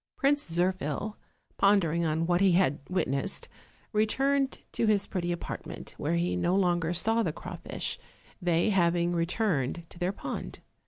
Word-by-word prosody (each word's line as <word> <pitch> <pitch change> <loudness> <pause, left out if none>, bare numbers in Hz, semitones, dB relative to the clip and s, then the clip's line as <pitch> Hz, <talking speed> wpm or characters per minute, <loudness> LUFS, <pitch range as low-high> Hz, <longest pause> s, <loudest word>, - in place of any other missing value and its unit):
Prince 285 -5 +2
Zirphil, 180 +3 -1 0.4
pondering 170 -5 +3
on 160 +1 +1
what 175 +1 +2
he 195 -2 +5
had 170 -6 +3
witnessed, 180 -1 -1 0.5
returned 270 +6 +2
to 230 - 0
his 205 -2 +4
pretty 175 -2 -2
apartment, 175 - -6
where - - 0
he 90 +1 +1
no 175 - +1
longer 175 -3 +2
saw 225 +7 +1
the - - 0
crawfish, - - -5 0.4
they 175 +3 +2
having 175 -2 +2
returned 170 - 0
to - - -13
their 180 +1 +1
pond. - - -6
175 Hz, 145 wpm, -29 LUFS, 170-200 Hz, 0.5 s, he